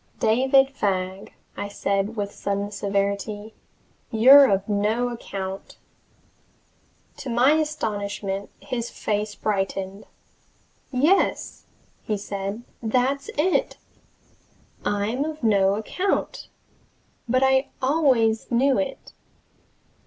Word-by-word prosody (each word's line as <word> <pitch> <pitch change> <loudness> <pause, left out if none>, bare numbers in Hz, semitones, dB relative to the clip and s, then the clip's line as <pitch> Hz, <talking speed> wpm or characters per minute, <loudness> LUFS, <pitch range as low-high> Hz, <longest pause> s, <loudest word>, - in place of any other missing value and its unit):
"David 265 +4 +4
Fagg," 190 -6 -2 0.2
I 200 - -4
said 200 +1 -1
with 205 -2 -3
sudden 200 0 -3
severity, 200 +2 -2 0.6
"you're 265 +5 +8
of 195 0 +1
no 215 +4 0
account!" 195 -5 -6 1.4
To 275 - -7
my 245 +4 +4
astonishment 205 -10 -2
his 235 -2 -4
face 210 0 -3
brightened. 195 -1 -3 0.9
"Yes," 295 +9 +1 0.5
said 200 +2 -5 0.2
he, 230 - -4
"that's 260 +4 0
it! 370 +10 +1 1.1
I'm 210 +6 -1
of 310 -2 -6
no 200 -3 +3
account! 365 - -2 0.8
But 255 +2 +3
I 265 +1 +3
always 255 -6 +2
knew 260 +3 +3
it. 275 -2 -5
220 Hz, 95 wpm, -24 LUFS, 200-265 Hz, 1.4 s, you're